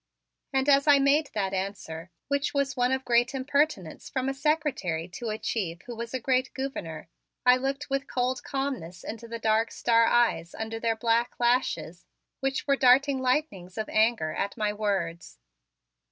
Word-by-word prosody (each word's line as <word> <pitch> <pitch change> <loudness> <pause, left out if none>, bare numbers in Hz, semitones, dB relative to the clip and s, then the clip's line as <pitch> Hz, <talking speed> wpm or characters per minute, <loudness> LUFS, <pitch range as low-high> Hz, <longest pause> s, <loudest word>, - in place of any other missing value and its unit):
And 265 0 +1
as 280 +1 +5
I 290 -1 +8
made 280 +2 +3
that 195 -2 -1
answer, 185 -3 -4 0.2
which 280 +1 -1
was 280 0 0
one 250 0 +2
of 265 0 -1
great 240 +2 +2
impertinence 265 - -1
from 260 0 -1
a - - -1
secretary 270 - -1
to 225 +5 -5
a 215 - -2
chief 185 -6 -3
who 240 - -8
was 230 0 -6
a 260 - -2
great 255 +1 +1
gouverneur, 220 - -5 0.4
I 250 0 +7
looked 275 +3 -3
with 275 0 -1
cold 255 +1 -1
calmness 260 -11 -4
into 230 +1 -7
the 230 0 -5
dark 225 0 +1
star 230 -1 +3
eyes 230 -8 +2
under 225 0 -4
their 225 0 0
black 230 +2 +1
lashes, 210 -9 0 0.3
which 270 +1 -1
were 280 -1 +3
darting 270 +1 +4
lightnings 250 - -1
of 220 - -3
anger 215 -8 +2
at 200 +6 -3
my 210 -1 0
words. 195 -6 -2
240 Hz, 170 wpm, -27 LUFS, 205-270 Hz, 0.4 s, I